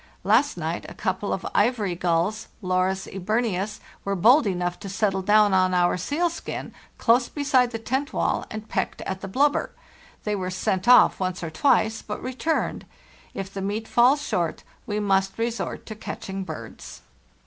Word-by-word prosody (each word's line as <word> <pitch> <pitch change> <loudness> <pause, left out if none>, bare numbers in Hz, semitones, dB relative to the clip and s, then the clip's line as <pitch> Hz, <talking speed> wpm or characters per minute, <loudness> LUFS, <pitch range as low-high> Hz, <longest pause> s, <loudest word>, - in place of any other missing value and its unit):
Last 225 +6 +3
night 165 +1 -3
a - - -11
couple 190 +2 -2
of 190 - -3
ivory 210 -3 +2
gulls 175 +5 0 0.2
(Larus 185 +1 0
eburneus), 205 +1 -2 0.2
were 200 0 -1
bold 235 - +5
enough 180 -2 -2
to 195 - -7
settle 195 -1 0
down 210 +1 +4
on 185 -1 +3
our 175 0 +3
sealskin, 325 - -3 0.2
close 240 +1 +3
beside 275 -4 +2
the 230 - -4
tent 265 +6 -2
wall, - - 0
and 215 0 -7
pecked - - -2
at 190 0 -4
the - - -5
blubber. 280 +9 +1 0.5
They 210 -1 -1
were 185 -2 -3
sent 185 +2 -1
off 250 0 +7
once 185 -1 -2
or 165 - -4
twice, 220 - +2
but 210 - -6
returned. 260 +6 -2 0.5
If 195 0 -5
the 195 - -4
meat 210 +3 -3
falls 260 +5 +4
short 170 -2 -1 0.2
we 210 0 -1
must 195 -1 +1
resort 230 -2 -3
to 220 - -6
catching 195 -2 -6
birds." - - -9
205 Hz, 165 wpm, -25 LUFS, 185-235 Hz, 0.5 s, off